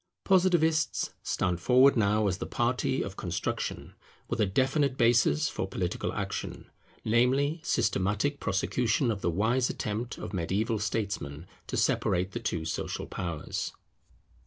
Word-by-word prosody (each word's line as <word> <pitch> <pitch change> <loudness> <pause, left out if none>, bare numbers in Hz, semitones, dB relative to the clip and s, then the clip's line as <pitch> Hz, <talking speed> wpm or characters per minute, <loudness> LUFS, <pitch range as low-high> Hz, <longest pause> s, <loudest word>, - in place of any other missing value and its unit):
Positivists 175 -4 +2
stand 90 -2 -1
forward 130 +8 +5
now 105 -1 +2
as 95 -1 0
the - - -4
party 125 +2 0
of 95 0 -6
construction, 85 -3 -3 0.3
with - - -1
a 105 - +3
definite 135 +6 +1
basis 120 +6 +3
for 95 - -3
political 90 -2 -2
action; - - -5 0.3
namely, 135 +8 +2
systematic 105 +7 0
prosecution 115 +5 +1
of 100 -3 -4
the - - +1
wise 115 +8 +1
attempt 110 +3 -3
of - - -7
mediaeval 100 +5 0
statesmen 100 -8 -3 0.2
to - - -3
separate 90 +2 +1
the 120 - -4
two 85 -8 -2
social 80 - -3
powers. 85 -5 -4
110 Hz, 135 wpm, -29 LUFS, 95-130 Hz, 0.3 s, forward